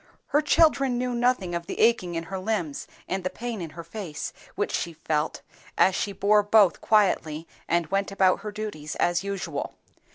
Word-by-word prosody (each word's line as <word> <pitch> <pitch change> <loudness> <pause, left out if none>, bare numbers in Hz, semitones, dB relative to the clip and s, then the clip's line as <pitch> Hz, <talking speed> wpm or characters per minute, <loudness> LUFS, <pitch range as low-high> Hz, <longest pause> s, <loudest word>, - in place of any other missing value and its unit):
Her 295 - +3
children 280 -4 +3
knew 250 0 -1
nothing 240 -7 +1
of 170 0 -3
the - - -5
aching 215 -7 +3
in 165 - -2
her 190 +3 -5
limbs 185 -7 -2 0.2
and 190 0 -2
the 185 - -1
pain 230 -2 -5
in 165 - -5
her 170 - -6
face 170 -3 -6 0.2
which - - -1
she 170 - -2
felt, 155 -1 -2 0.3
as 190 - +5
she 200 - -1
bore 210 +1 +3
both 205 -2 +4
quietly 170 -7 +2 0.2
and 170 0 +2
went 195 0 0
about 190 -2 +3
her 210 - -6
duties 205 -8 -5
as 175 +1 +1
usual. 200 -1 -4
195 Hz, 185 wpm, -26 LUFS, 170-215 Hz, 0.3 s, as